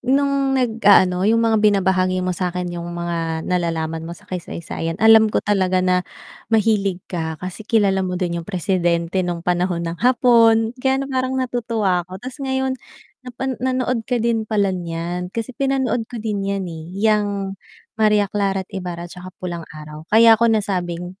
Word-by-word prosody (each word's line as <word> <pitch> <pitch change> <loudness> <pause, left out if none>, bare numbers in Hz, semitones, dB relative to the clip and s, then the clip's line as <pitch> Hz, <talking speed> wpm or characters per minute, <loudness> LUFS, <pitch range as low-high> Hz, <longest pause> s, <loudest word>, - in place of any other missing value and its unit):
nung 275 +1 +1
nag-aano, 205 -6 +4
yung 230 +1 +3
mga 220 -2 +3
binabahagi 185 -3 +2
mo 185 - 0
sa'kin 180 0 -3
yung 170 0 -5
mga 165 -2 -3
nalalaman 165 -2 -1
mo 170 - -7
sa - - -19
kaysaysayan, 165 -2 -5
alam 220 +1 +6
ko - - -1
talaga 185 -3 +1
na 180 0 +3 0.5
mahilig 205 -4 +1
ka 160 -3 -4
kasi 185 +5 -7
kilala 200 -4 +3
mo 180 -1 -2
din 170 -2 -2
yung 165 - -13
presidente 175 -2 0
nung 175 -2 -3
panahon 175 -1 0
ng 165 0 -5
Hapon, 230 -2 +4
kaya 265 +1 +2
ano 275 - -2
parang 260 0 -1
natutuwa 225 -8 -1
ako, 185 - -7
ta's 255 +7 -9
ngayon 265 -1 -1 0.5
napa 260 +1 -4
nanood 255 -1 0
ka 250 - +1
din 225 -2 0
pala 200 -3 +1
niyan, 175 0 -4
kasi 230 +5 -5
pinanood 265 -4 -1
ko 245 - -8
din 215 -2 -3
yan, 195 0 -2
eh, 165 -3 -7
yang 205 -2 +1 0.5
Maria 210 -1 +4
Clara 195 -2 0
at - - -38
Ibarra, 175 -3 -5
tsaka 180 +1 -10
Pulang 170 -3 -6
Araw, 155 +1 -10
kaya 225 0 +6
ko 235 - +4
nasabing 185 -4 -2
195 Hz, 165 wpm, -20 LUFS, 175-225 Hz, 0.5 s, alam